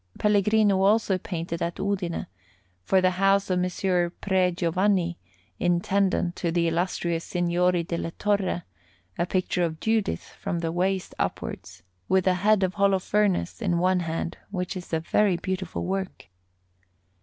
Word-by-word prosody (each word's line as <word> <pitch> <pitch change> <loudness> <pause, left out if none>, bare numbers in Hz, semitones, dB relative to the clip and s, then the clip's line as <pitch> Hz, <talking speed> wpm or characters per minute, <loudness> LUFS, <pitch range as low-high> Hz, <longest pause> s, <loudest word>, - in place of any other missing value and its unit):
Pellegrino 210 -1 +3
also 200 -1 +3
painted 170 -2 -4
at 170 0 -2
Udine, 190 -4 -2 0.6
for 190 - +3
the 185 0 +3
house 195 +1 +2
of 180 - +2
Messer 180 -1 0
Pre 185 0 +1
Giovanni, 175 +1 0 0.4
intendant 180 0 +1
to 170 - -1
the 170 0 +1
illustrious 170 0 -1
Signori 175 0 +1
della 170 0 -3
Torre, 200 -1 -1 0.6
a 175 - +1
picture 185 -1 0
of 160 -2 -1
Judith 220 -2 0 0.2
from 195 -4 -2
the 165 -1 -2
waist 185 +2 -1
upwards, - - -4 0.3
with 190 -1 +3
the 185 - +4
head 200 +2 +3
of 185 0 0
Holofernes 200 0 +1
in 180 -5 +1
one 185 +1 +2
hand, 165 0 -3
which 180 -1 -3
is 180 -1 -8
a 160 - +1
very 185 +3 +2
beautiful 185 -1 -3
work. 190 - -4
185 Hz, 145 wpm, -26 LUFS, 175-195 Hz, 0.6 s, the